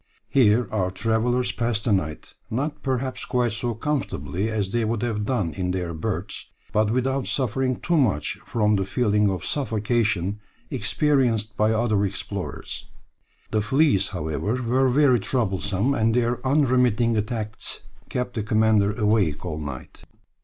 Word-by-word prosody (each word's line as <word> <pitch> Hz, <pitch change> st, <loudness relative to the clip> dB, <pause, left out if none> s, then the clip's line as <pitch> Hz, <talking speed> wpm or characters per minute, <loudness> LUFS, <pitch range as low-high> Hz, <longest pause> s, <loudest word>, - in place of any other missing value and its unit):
Here 120 Hz, -2 st, +4 dB
our 95 Hz, -4 st, 0 dB
travellers 115 Hz, +5 st, 0 dB
passed 115 Hz, -3 st, -1 dB
the 115 Hz, -, 0 dB
night, 80 Hz, -6 st, -1 dB, 0.2 s
not 145 Hz, +6 st, -2 dB
perhaps 130 Hz, -1 st, -2 dB
quite 125 Hz, -2 st, 0 dB
so 115 Hz, +2 st, -1 dB
comfortably 105 Hz, -, -2 dB
as 105 Hz, -3 st, -1 dB
they 120 Hz, +1 st, +1 dB
would 110 Hz, 0 st, -1 dB
have 105 Hz, -3 st, -1 dB
done 105 Hz, -10 st, -1 dB
in 90 Hz, -1 st, -2 dB
their 90 Hz, -2 st, -2 dB
berths, 80 Hz, -, -3 dB, 0.2 s
but 105 Hz, 0 st, +3 dB
without 130 Hz, +3 st, 0 dB
suffering 130 Hz, 0 st, 0 dB
too 170 Hz, -1 st, +1 dB
much 110 Hz, -, +1 dB
from 105 Hz, -2 st, +1 dB
the 95 Hz, -, +1 dB
feeling 105 Hz, -1 st, +2 dB
of 95 Hz, -2 st, -3 dB
suffocation 110 Hz, -, 0 dB, 0.3 s
experienced 120 Hz, -8 st, +1 dB
by 110 Hz, +1 st, +2 dB
other 110 Hz, -2 st, +1 dB
explorers. 100 Hz, 0 st, -4 dB, 0.6 s
The 110 Hz, -, +2 dB
fleas, 135 Hz, 0 st, +3 dB
however, 80 Hz, +9 st, -2 dB
were 130 Hz, +3 st, +2 dB
very 130 Hz, -2 st, +4 dB
troublesome, 105 Hz, +1 st, 0 dB
and 110 Hz, -3 st, +2 dB
their 120 Hz, 0 st, 0 dB
unremitting 125 Hz, -4 st, +3 dB
attacks 110 Hz, 0 st, -2 dB, 0.3 s
kept 125 Hz, 0 st, -2 dB
the 110 Hz, -, -2 dB
commander 110 Hz, -1 st, +3 dB
awake 105 Hz, -8 st, +1 dB
all 80 Hz, -3 st, -3 dB
night. 70 Hz, -4 st, -8 dB
110 Hz, 145 wpm, -24 LUFS, 100-125 Hz, 0.6 s, Here